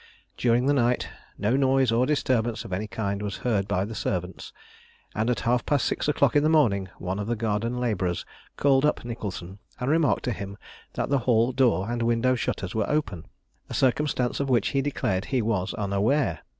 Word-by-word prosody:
During 120 +1 +2
the 145 - +3
night 125 -2 +1 0.3
no 105 +5 +1
noise 135 -2 +3
or 120 +3 +2
disturbance 120 -6 0
of 95 - -6
any 105 +4 -2
kind 100 -2 -3
was 105 -1 -4
heard 100 -5 +1
by 95 0 0
the 110 - -7
servants, 90 -3 -4 0.6
and 110 +2 0
at 125 - 0
half 120 0 +1
past 145 -2 +1
six - - -1
o'clock 140 -3 +2
in 145 - +5
the 155 - +2
morning 105 -12 +3
one 95 +2 -3
of 105 - -3
the 120 - 0
garden 115 +2 -1
labourers 95 -8 -1 0.3
called 135 -1 +3
up 150 -5 +1
Nicholson 100 -5 -6 0.2
and 125 +2 0
remarked 160 -1 +2
to 125 - -1
him 100 -2 -6 0.4
that - - -2
the 140 -1 +2
hall 115 +1 +4
door 120 -7 +2
and 120 0 -2
window 120 +2 +2
shutters 105 -5 -3
were 110 -2 -1
open, 105 - -2 0.4
a - - -5
circumstance 130 -1 +1
of 140 -1 -1
which 120 -5 +2
he 135 - +1
declared 125 -9 -1
he 130 -1 0
was 105 -5 0
unaware. 100 - 0
115 Hz, 195 wpm, -26 LUFS, 100-130 Hz, 0.6 s, in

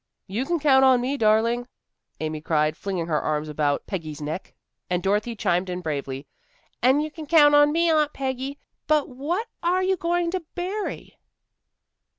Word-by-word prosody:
"You 220 +7 -3
can 345 -1 0
count 270 -3 +5
on 260 -2 +6
me, 255 +3 -1
darling," 230 +1 +2 0.5
Amy 155 -1 -3
cried, 155 -1 +1
flinging 185 -3 -3
her 155 -3 0
arms 150 0 -1
about 145 -1 0
Peggy's 160 -6 -5
neck. 155 +5 -6 0.3
And 180 0 -1
Dorothy 210 +4 0
chimed 180 -2 0
in 180 0 -4
bravely, 140 -4 -4 0.6
"An' 265 +4 +4
you 310 0 -4
can 310 -1 -9
count 295 -2 +6
on 290 0 +6
me, 335 +2 +2
Aunt 305 -2 +2
Peggy. 265 +1 -4 0.3
But 305 0 +4
but - - -13
what 315 - -3
are 360 +2 +1
you 380 0 +1
going 345 0 0
to 375 - -1 0.2
bury?" 380 +4 -4
250 Hz, 170 wpm, -24 LUFS, -, 0.6 s, on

